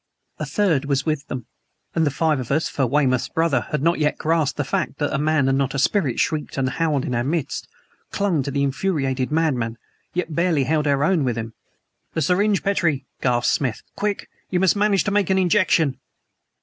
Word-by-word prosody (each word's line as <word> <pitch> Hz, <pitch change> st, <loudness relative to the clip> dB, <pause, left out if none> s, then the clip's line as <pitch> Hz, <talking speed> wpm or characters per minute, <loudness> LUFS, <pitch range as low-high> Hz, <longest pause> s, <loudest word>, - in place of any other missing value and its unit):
A -, -, -3 dB
third 170 Hz, -, +1 dB
was 140 Hz, -1 st, 0 dB
with 155 Hz, -3 st, -1 dB
them; 125 Hz, -4 st, -5 dB, 0.5 s
and 165 Hz, -2 st, +2 dB
the -, -, +3 dB
five 155 Hz, 0 st, +1 dB
of 125 Hz, -, -5 dB
us 155 Hz, +4 st, +1 dB
(for 135 Hz, -3 st, 0 dB
Weymouth's 130 Hz, -2 st, +1 dB
brother 160 Hz, -7 st, +1 dB
had 150 Hz, -2 st, -2 dB
not 170 Hz, 0 st, +2 dB
yet 150 Hz, -1 st, +1 dB
grasped 160 Hz, -2 st, 0 dB
the 145 Hz, -, 0 dB
fact 140 Hz, -, -2 dB
that 145 Hz, -, -1 dB
a -, -, 0 dB
man 150 Hz, -2 st, +2 dB
and 135 Hz, 0 st, +2 dB
not 135 Hz, 0 st, -1 dB
a -, -, 0 dB
spirit 140 Hz, -, +1 dB
shrieked 155 Hz, -2 st, -1 dB
and 135 Hz, -1 st, +1 dB
howled 150 Hz, -3 st, 0 dB
in 125 Hz, -, -2 dB
our 120 Hz, 0 st, 0 dB
midst) 145 Hz, +1 st, -2 dB, 0.4 s
clung 190 Hz, -7 st, 0 dB
to 135 Hz, -, -3 dB
the 140 Hz, 0 st, 0 dB
infuriated 135 Hz, -3 st, -1 dB
madman, 130 Hz, -8 st, 0 dB, 0.4 s
yet 175 Hz, -3 st, -2 dB
barely 170 Hz, -3 st, +2 dB
held 150 Hz, +2 st, +1 dB
our 140 Hz, 0 st, +2 dB
own 165 Hz, -1 st, +2 dB
with 120 Hz, -3 st, -1 dB
him. 115 Hz, 0 st, -5 dB, 0.6 s
"The 160 Hz, -, +1 dB
syringe, 195 Hz, +5 st, +2 dB
Petrie!" 170 Hz, -9 st, +1 dB, 0.2 s
gasped 120 Hz, -2 st, +2 dB
Smith. 125 Hz, -6 st, -1 dB
"Quick! 205 Hz, -1 st, -2 dB, 0.2 s
You 180 Hz, -, +1 dB
must 190 Hz, +1 st, +3 dB
manage 205 Hz, -1 st, +2 dB
to 205 Hz, -, -1 dB
make 205 Hz, -2 st, +1 dB
an 190 Hz, -, +3 dB
injection!" 180 Hz, -6 st, +2 dB
150 Hz, 205 wpm, -22 LUFS, 135-170 Hz, 0.6 s, the